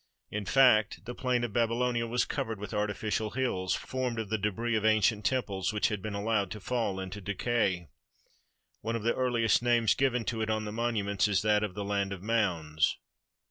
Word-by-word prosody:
In 105 Hz, -1 st, -3 dB
fact, 115 Hz, -4 st, +4 dB
the 120 Hz, -, -5 dB
plain 125 Hz, -1 st, 0 dB
of 120 Hz, -4 st, -3 dB
Babylonia 120 Hz, 0 st, +1 dB
was 120 Hz, +1 st, +1 dB
covered 115 Hz, -7 st, -3 dB
with 105 Hz, +2 st, -6 dB
artificial 105 Hz, +1 st, -1 dB
hills 105 Hz, -7 st, -1 dB
formed 130 Hz, -2 st, -3 dB
of 110 Hz, -3 st, -3 dB
the 110 Hz, -, +1 dB
debris 110 Hz, +3 st, -1 dB
of 110 Hz, -, 0 dB
ancient 110 Hz, 0 st, +3 dB
temples 100 Hz, -8 st, 0 dB
which 105 Hz, 0 st, +1 dB
had 105 Hz, -3 st, -3 dB
been 105 Hz, +1 st, -4 dB
allowed 100 Hz, 0 st, 0 dB
to 105 Hz, -, -6 dB
fall 110 Hz, -2 st, -1 dB
into 95 Hz, +2 st, -6 dB
decay. 100 Hz, -3 st, 0 dB, 0.9 s
One 115 Hz, +1 st, -2 dB
of 115 Hz, -, -3 dB
the 115 Hz, -, +2 dB
earliest 120 Hz, -3 st, +2 dB
names 120 Hz, -2 st, +3 dB
given 125 Hz, -4 st, +1 dB
to 115 Hz, -2 st, -2 dB
it 110 Hz, -, -1 dB
on 110 Hz, 0 st, 0 dB
the 105 Hz, -, -4 dB
monuments 105 Hz, -3 st, 0 dB
is 100 Hz, -2 st, +1 dB
that 105 Hz, -1 st, +3 dB
of 100 Hz, -3 st, -3 dB
"the 100 Hz, -1 st, -4 dB
land 100 Hz, -1 st, -1 dB
of 95 Hz, -1 st, -9 dB
mounds." 85 Hz, -9 st, +1 dB
110 Hz, 195 wpm, -30 LUFS, 100-120 Hz, 0.9 s, fact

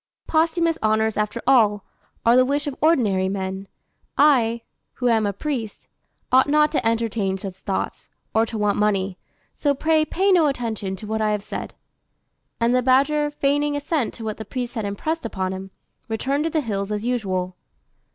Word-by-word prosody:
"Posthumous 330 Hz, +1 st, +1 dB
honours, 220 Hz, 0 st, +2 dB
after 210 Hz, +2 st, -1 dB
all, 220 Hz, -6 st, +4 dB, 0.4 s
are 235 Hz, +1 st, +6 dB
the 255 Hz, -, +6 dB
wish 285 Hz, +3 st, -1 dB
of 285 Hz, -2 st, -4 dB
ordinary 215 Hz, -, +3 dB
men. 190 Hz, 0 st, -4 dB, 0.5 s
I, 235 Hz, -6 st, +4 dB, 0.3 s
who 250 Hz, -, -2 dB
am 220 Hz, -2 st, +3 dB
a -, -, 0 dB
priest, 230 Hz, 0 st, -5 dB, 0.4 s
ought 260 Hz, +2 st, +5 dB
not 300 Hz, 0 st, +4 dB
to 300 Hz, -, 0 dB
entertain 225 Hz, -4 st, 0 dB
such 190 Hz, -1 st, -6 dB
thoughts, 190 Hz, +1 st, -4 dB, 0.2 s
or 220 Hz, -, +4 dB
to 225 Hz, -, -5 dB
want 210 Hz, -1 st, +1 dB
money; 195 Hz, -3 st, 0 dB, 0.3 s
so 285 Hz, -1 st, 0 dB
pray 315 Hz, +2 st, +2 dB
pay 385 Hz, +5 st, +1 dB
no 340 Hz, -5 st, +5 dB
attention 225 Hz, -8 st, -3 dB
to 190 Hz, -, -9 dB
what 220 Hz, +1 st, -2 dB
I 215 Hz, -, +2 dB
have 210 Hz, -1 st, -1 dB
said;" -, -, -6 dB, 0.8 s
and 235 Hz, +1 st, +2 dB
the 255 Hz, -, +3 dB
badger, 280 Hz, +4 st, +3 dB
feigning 290 Hz, 0 st, 0 dB
assent 290 Hz, -2 st, -1 dB
to 230 Hz, -, -9 dB
what 215 Hz, -1 st, -4 dB
the 220 Hz, -, -6 dB
priest 245 Hz, 0 st, -5 dB
had 220 Hz, -4 st, -3 dB
impressed 310 Hz, +12 st, -3 dB
upon 190 Hz, -4 st, -3 dB
it, 190 Hz, 0 st, -7 dB, 0.4 s
returned 270 Hz, +7 st, -1 dB
to -, -, +1 dB
the 315 Hz, -1 st, 0 dB
hills 200 Hz, -5 st, -3 dB
as 210 Hz, +1 st, -2 dB
usual. 185 Hz, -7 st, -1 dB
230 Hz, 180 wpm, -23 LUFS, 205-285 Hz, 0.8 s, are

